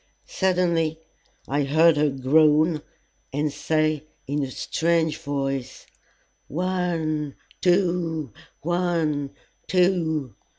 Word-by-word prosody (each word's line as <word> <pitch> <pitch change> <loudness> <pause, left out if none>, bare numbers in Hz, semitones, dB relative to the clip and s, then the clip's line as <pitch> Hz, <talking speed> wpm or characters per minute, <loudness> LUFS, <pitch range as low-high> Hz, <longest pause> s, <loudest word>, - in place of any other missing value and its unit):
Suddenly 170 -4 +1 0.5
I 145 +2 +1
heard 155 +4 +5
her 150 0 +2
groan, 150 +4 +3 0.5
and 145 +1 -1
say 155 -1 0 0.2
in 145 +2 -1
a 135 - -2
strange 160 +2 0
voice, 135 -4 -3 0.6
"One 165 -4 -1 0.3
two 175 - +1 0.3
one 165 -4 0 0.4
two!" 165 - +1
155 Hz, 85 wpm, -24 LUFS, 145-170 Hz, 0.6 s, heard